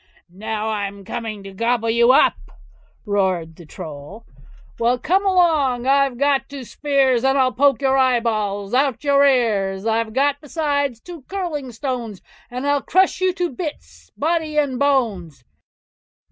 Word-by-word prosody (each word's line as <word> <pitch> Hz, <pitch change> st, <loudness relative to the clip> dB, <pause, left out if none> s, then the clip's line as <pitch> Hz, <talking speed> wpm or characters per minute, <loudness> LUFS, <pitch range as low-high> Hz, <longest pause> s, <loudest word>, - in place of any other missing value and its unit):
"Now, 220 Hz, +2 st, -4 dB
I'm 200 Hz, -2 st, -4 dB
coming 220 Hz, -2 st, -5 dB
to 195 Hz, -, -9 dB
gobble 230 Hz, +2 st, 0 dB
you 235 Hz, +2 st, +4 dB
up", 265 Hz, -, +5 dB, 0.7 s
roared 185 Hz, -6 st, -1 dB
the 170 Hz, -2 st, -14 dB
Troll. 155 Hz, +9 st, -10 dB, 0.5 s
Well, 240 Hz, +2 st, +2 dB
come 375 Hz, +10 st, +1 dB
along! 310 Hz, -10 st, +2 dB
I've 275 Hz, -2 st, +2 dB
got 280 Hz, 0 st, +1 dB
two 280 Hz, -2 st, -8 dB
spears, 265 Hz, -2 st, +1 dB
And 270 Hz, +1 st, +2 dB
I'll 260 Hz, -1 st, +3 dB
poke 275 Hz, +1 st, +2 dB
your 265 Hz, 0 st, +3 dB
eyeballs 215 Hz, -5 st, 0 dB
out 270 Hz, 0 st, +2 dB
at -, -, -26 dB
your 280 Hz, -1 st, +4 dB
ears; 205 Hz, -7 st, +1 dB
I've 225 Hz, 0 st, 0 dB
got 285 Hz, +2 st, +1 dB
besides 285 Hz, -5 st, -2 dB
two 345 Hz, +3 st, -11 dB
curling 330 Hz, -9 st, -4 dB
stones, 235 Hz, -4 st, -5 dB, 0.3 s
And 250 Hz, +3 st, -5 dB
I'll 285 Hz, 0 st, +1 dB
crush 375 Hz, +3 st, +1 dB
you 370 Hz, 0 st, +3 dB
to 355 Hz, -2 st, -2 dB
bits, 305 Hz, +3 st, -8 dB
body 315 Hz, 0 st, -1 dB
and 275 Hz, -4 st, 0 dB
bones. 205 Hz, -, 0 dB
255 Hz, 150 wpm, -20 LUFS, 220-285 Hz, 0.7 s, up